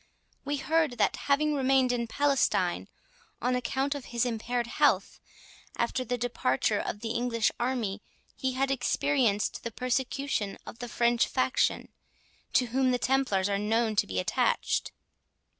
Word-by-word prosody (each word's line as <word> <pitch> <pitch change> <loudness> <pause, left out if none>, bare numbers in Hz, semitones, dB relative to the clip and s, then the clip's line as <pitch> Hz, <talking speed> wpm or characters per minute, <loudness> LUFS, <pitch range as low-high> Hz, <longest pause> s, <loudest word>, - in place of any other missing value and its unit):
—We 285 +1 -2
heard, 315 -1 +1
that, - - +2
having 300 +2 +1
remained 265 -2 +3
in 235 -1 -1
Palestine, 280 +2 +1 0.5
on 250 - 0
account 265 +3 -1
of 285 -3 -7
his 235 0 -1
impaired 240 +1 -2
health, 235 - +1 0.6
after 255 - 0
the 245 0 -2
departure 215 - 0
of 205 - -4
the 230 - -3
English 235 -2 +1
army, 235 -5 -1 0.3
he 260 -1 -2
had 270 +1 0
experienced 255 -4 +1
the 235 - -3
persecution 255 -2 -2
of 230 - -10
the 245 - -6
French 235 +1 +2
faction, 260 0 0 0.6
to 255 - +4
whom 265 0 +3
the 250 - +2
Templars 250 -8 +1
are 200 -1 0
known 220 +1 +1
to - - +3
be 95 - -4
attached." 90 - 0
245 Hz, 145 wpm, -29 LUFS, 230-270 Hz, 0.6 s, to